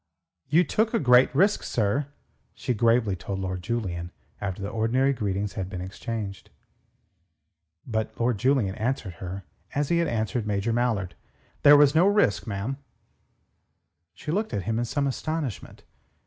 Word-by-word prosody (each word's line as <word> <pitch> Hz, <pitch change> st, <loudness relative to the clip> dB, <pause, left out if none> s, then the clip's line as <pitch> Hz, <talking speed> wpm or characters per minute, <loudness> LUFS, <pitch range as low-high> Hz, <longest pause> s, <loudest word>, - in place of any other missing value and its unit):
"You 165 Hz, +5 st, +5 dB
took 220 Hz, +5 st, 0 dB
a -, -, +3 dB
great 125 Hz, -1 st, +6 dB
risk, 200 Hz, +2 st, +3 dB
sir," 120 Hz, +6 st, 0 dB, 0.5 s
she 125 Hz, -, -2 dB
gravely 115 Hz, -2 st, +2 dB
told 95 Hz, +2 st, -5 dB
Lord 95 Hz, -1 st, -3 dB
Julian 90 Hz, -6 st, -3 dB, 0.3 s
after 100 Hz, -2 st, -3 dB
the 100 Hz, +1 st, -4 dB
ordinary 125 Hz, +5 st, +2 dB
greetings 100 Hz, -3 st, -2 dB
had 95 Hz, -3 st, -4 dB
been 95 Hz, -, -5 dB
exchanged. 100 Hz, +1 st, -6 dB, 1.4 s
But 110 Hz, -2 st, -3 dB
Lord 120 Hz, -3 st, +1 dB
Julian 125 Hz, -6 st, +2 dB
answered 110 Hz, -3 st, -2 dB
her 95 Hz, +1 st, -5 dB, 0.3 s
as 145 Hz, 0 st, 0 dB
he 170 Hz, -, +3 dB
had 170 Hz, -, +1 dB
answered 110 Hz, 0 st, -1 dB
Major 105 Hz, +2 st, 0 dB
Mallard. 115 Hz, -7 st, 0 dB, 0.5 s
"There 145 Hz, 0 st, +8 dB
was 145 Hz, -1 st, +6 dB
no 170 Hz, +4 st, +5 dB
risk, 205 Hz, -, +2 dB
ma'am." 110 Hz, +6 st, -3 dB, 1.4 s
She 150 Hz, -, -5 dB
looked 210 Hz, +5 st, -1 dB
at 100 Hz, -, -2 dB
him 115 Hz, +3 st, -1 dB
in 120 Hz, -, 0 dB
some 140 Hz, +4 st, -1 dB
astonishment. 140 Hz, -, -4 dB
115 Hz, 150 wpm, -26 LUFS, 100-140 Hz, 1.4 s, There